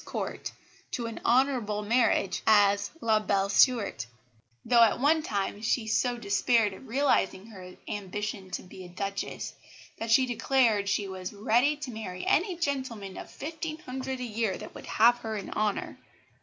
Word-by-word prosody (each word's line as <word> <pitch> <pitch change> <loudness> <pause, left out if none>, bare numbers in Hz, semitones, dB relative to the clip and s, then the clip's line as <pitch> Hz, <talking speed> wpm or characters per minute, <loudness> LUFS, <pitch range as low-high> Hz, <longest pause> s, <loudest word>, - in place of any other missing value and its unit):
's - - -17
Court - - -5 0.4
to 240 - -2
an 230 -1 -6
honourable 240 -5 +2
marriage 215 -4 +2
as 205 -1 +4
La 220 -2 +3
belle 200 -2 0
Stuart; 205 - +3 0.6
though 235 0 +5
at 230 0 +5
one 310 +4 +3
time 205 -5 -3
she 225 +1 0
so 245 +2 +1
despaired 210 0 +2
of 265 - -12
realising 220 -7 +1
her 185 -5 -11
ambition 205 -1 -4
"to - - -5
be 185 0 -11
a 180 - -10
Duchess" 195 +2 -4 0.5
that 225 - -4
she 255 +4 +5
declared 230 -4 +2
she 200 0 0
was 185 0 -6
"ready 240 +7 +2
to 290 -4 -6
marry 185 -5 -6
any 365 +2 +2
gentleman 260 - -3
of - - -8
fifteen 315 +1 -5
hundred 260 -2 -5
a - - -4
year 225 -4 -1
that - - -10
would - - -10
have 240 +2 +4
her 220 -2 -4
in 200 - -6
honour." 210 -1 -2
220 Hz, 170 wpm, -28 LUFS, 200-255 Hz, 0.6 s, though